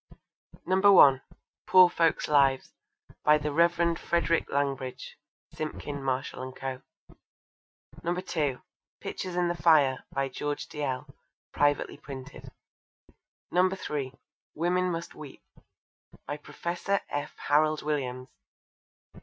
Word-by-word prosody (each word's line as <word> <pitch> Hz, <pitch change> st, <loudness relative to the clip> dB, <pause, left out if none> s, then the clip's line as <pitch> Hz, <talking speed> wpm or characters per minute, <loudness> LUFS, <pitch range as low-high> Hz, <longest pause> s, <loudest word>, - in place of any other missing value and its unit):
(1) 185 Hz, -8 st, +6 dB, 0.5 s
Poor 185 Hz, -1 st, +8 dB
Folks' 165 Hz, -2 st, +1 dB
Lives. 135 Hz, -3 st, +2 dB, 0.5 s
By 150 Hz, 0 st, +6 dB
the 150 Hz, 0 st, -3 dB
Rev. 170 Hz, +1 st, +2 dB
Frederick 170 Hz, -1 st, 0 dB
Langbridge. 135 Hz, -2 st, -2 dB, 0.4 s
(Simpkin, 145 Hz, -2 st, -5 dB
Marshall 130 Hz, -1 st, -3 dB
and 130 Hz, 0 st, -7 dB
Co.) 130 Hz, -1 st, -5 dB, 1.2 s
(2) 165 Hz, -6 st, -2 dB, 0.4 s
Pictures 185 Hz, -1 st, -5 dB
in 180 Hz, 0 st, +1 dB
the 175 Hz, -, 0 dB
Fire. 155 Hz, -6 st, +3 dB
By 135 Hz, 0 st, -1 dB
George 145 Hz, +2 st, -4 dB
Dalziel. 145 Hz, -2 st, -3 dB, 0.5 s
(Privately 145 Hz, 0 st, +1 dB
Printed.) 140 Hz, -1 st, -10 dB, 1.0 s
(3) 175 Hz, -7 st, 0 dB, 0.4 s
Women 180 Hz, +3 st, +1 dB
Must 170 Hz, 0 st, -5 dB
Weep. 150 Hz, -3 st, -11 dB, 0.8 s
By 145 Hz, -, -4 dB
Professor 175 Hz, +6 st, -3 dB
F. 145 Hz, 0 st, -4 dB
Harald 155 Hz, +1 st, +2 dB
Williams. 130 Hz, -4 st, -3 dB
150 Hz, 100 wpm, -28 LUFS, 135-170 Hz, 1.2 s, Poor